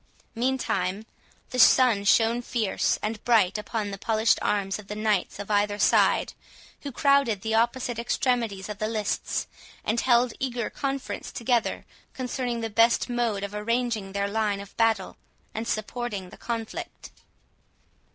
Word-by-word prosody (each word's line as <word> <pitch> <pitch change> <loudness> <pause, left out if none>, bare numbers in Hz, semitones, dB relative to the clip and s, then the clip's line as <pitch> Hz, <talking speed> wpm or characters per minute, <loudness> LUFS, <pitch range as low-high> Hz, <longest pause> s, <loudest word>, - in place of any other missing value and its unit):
Meantime, 220 -6 -1 0.5
the 255 - -2
sun 235 -4 +6
shone 225 +3 +3
fierce 230 -4 0
and 215 0 -3
bright 215 -6 +3
upon 210 -1 -3
the 195 - -6
polished 220 0 +2
arms 200 -1 0
of 205 - -11
the 210 - -5
knights 215 -3 0
of 205 +1 -6
either 205 0 +2
side, - - +3 0.5
who 285 - -5
crowded 275 -6 +2
the 220 0 -1
opposite 235 +1 +1
extremities 235 -5 -1
of 210 -2 -7
the 215 - 0
lists, 215 -2 -2 0.4
and 225 +2 0
held 245 -1 +3
eager 245 -4 -2
conference 275 -1 -4
together 240 -1 0 0.3
concerning 250 -2 -3
the 225 - -1
best 230 +3 +3
mode 235 -5 0
of 200 0 -5
arranging 225 -1 -1
their 200 0 0
line 205 -1 0
of 200 0 -11
battle, 225 -4 +1 0.4
and 225 +1 -4
supporting 215 -4 -3
the - - -11
conflict. 230 -2 -6
225 Hz, 145 wpm, -26 LUFS, 205-240 Hz, 0.5 s, sun